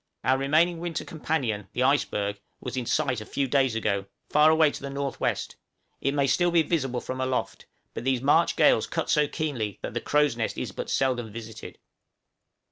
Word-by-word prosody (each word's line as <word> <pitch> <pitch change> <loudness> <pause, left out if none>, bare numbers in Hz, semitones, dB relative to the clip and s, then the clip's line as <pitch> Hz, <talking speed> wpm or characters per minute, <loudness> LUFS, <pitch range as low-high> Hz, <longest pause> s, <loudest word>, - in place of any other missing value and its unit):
Our 130 +2 +2
remaining 160 +5 +2
winter 170 -1 -4
companion, 130 - -2
the - - 0
iceberg, 100 0 +1 0.2
was 125 - -6
in 125 -2 -3
sight 130 -7 0
a - - -5
few 140 -1 -1
days 130 -3 +2
ago, 100 -3 -1 0.2
far 150 +1 +6
away 160 -1 +4
to - - -8
the 140 - -5
N.W.; 140 0 -1 0.7
it 140 - 0
may 140 - +2
be - - +2
still 175 +7 +3
visible 155 -7 +1
from 130 0 -5
aloft, 130 -1 -2 0.3
but - - -5
these 130 -1 +1
March 140 +4 +3
gales - - +4
cut - - -2
so 150 -1 +3
keenly, 125 -11 -3
that - - -4
the 120 - -2
crow's 150 -4 +2
nest 115 -1 -2
is - - -3
but - - -6
seldom 125 -4 0
visited. 110 0 -9
135 Hz, 190 wpm, -26 LUFS, 120-150 Hz, 0.7 s, far